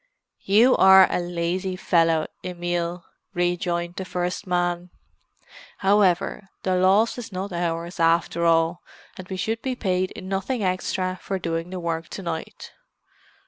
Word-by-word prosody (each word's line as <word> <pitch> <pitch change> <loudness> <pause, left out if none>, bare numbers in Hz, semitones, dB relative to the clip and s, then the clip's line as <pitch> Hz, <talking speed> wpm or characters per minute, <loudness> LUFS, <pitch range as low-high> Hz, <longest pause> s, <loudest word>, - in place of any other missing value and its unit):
"You 225 +6 +5
are 190 0 +8
a - - 0
lazy 175 +2 -2
fellow, 165 -3 +2 0.2
Emil," 175 -1 -3 0.3
rejoined 175 0 -1
the 190 - -3
first 180 +2 -3
man. 175 0 -1 0.9
"However, 195 -1 +2
the 185 -1 +1
loss 195 +6 +3
is 230 -2 -8
not 190 +1 -5
ours, 170 0 -3
after 165 0 +2
all, 165 +1 +2 0.3
and 185 -1 -9
we 190 - -5
should 225 +4 -2
be 260 -1 -2
paid 185 -5 -1
nothing 195 +5 -2
extra 185 0 -1
for 195 - -3
doing 165 -1 -3
the 185 0 -5
work 165 -1 -3
to 195 - -7
night. 170 -2 -6
180 Hz, 140 wpm, -24 LUFS, 170-190 Hz, 0.9 s, are